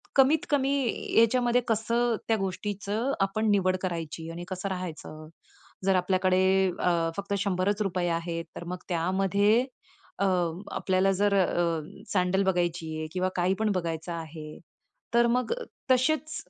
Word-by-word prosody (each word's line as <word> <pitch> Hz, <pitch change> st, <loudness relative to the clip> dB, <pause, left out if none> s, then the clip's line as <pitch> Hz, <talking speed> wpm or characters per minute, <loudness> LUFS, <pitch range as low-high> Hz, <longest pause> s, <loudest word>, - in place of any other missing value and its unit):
कमीत-कमी 275 Hz, 0 st, +3 dB, 0.5 s
याच्यामध्ये 245 Hz, +1 st, +3 dB
कसं 230 Hz, +1 st, +1 dB
त्या 225 Hz, -1 st, +2 dB
गोष्टीचं 205 Hz, +5 st, -2 dB
आपण 215 Hz, +3 st, +1 dB
निवड 185 Hz, -2 st, +2 dB
करायची 165 Hz, -2 st, -4 dB
आणि 170 Hz, +1 st, -6 dB
कसं 185 Hz, +1 st, -3 dB
राहायचं, 160 Hz, -4 st, -6 dB, 0.6 s
जर 195 Hz, -1 st, +4 dB
आपल्याकडे 185 Hz, +1 st, +3 dB, 0.5 s
फक्त 200 Hz, 0 st, -3 dB
100च 190 Hz, -1 st, 0 dB
आहेत 165 Hz, 0 st, -2 dB
तर -, -, -6 dB
मग 180 Hz, +1 st, -4 dB
त्यामध्ये 195 Hz, +7 st, +2 dB, 0.5 s
अ, 200 Hz, -, +2 dB, 0.5 s
आपल्याला 190 Hz, +1 st, +1 dB
जर 200 Hz, +1 st, +2 dB, 0.8 s
सॅडल 190 Hz, +1 st, +2 dB
बघायची 175 Hz, -3 st, 0 dB
आहे 155 Hz, 0 st, -4 dB
किंवा 185 Hz, 0 st, 0 dB
काही 180 Hz, +1 st, +2 dB
पण 220 Hz, -1 st, +1 dB
बघायचं 165 Hz, -1 st, -3 dB
आहे, 155 Hz, -2 st, -7 dB, 0.6 s
तर 235 Hz, 0 st, +5 dB
मग 250 Hz, -, 0 dB, 0.4 s
तसेच 310 Hz, +4 st, +2 dB
190 Hz, 120 wpm, -28 LUFS, 175-220 Hz, 0.8 s, तर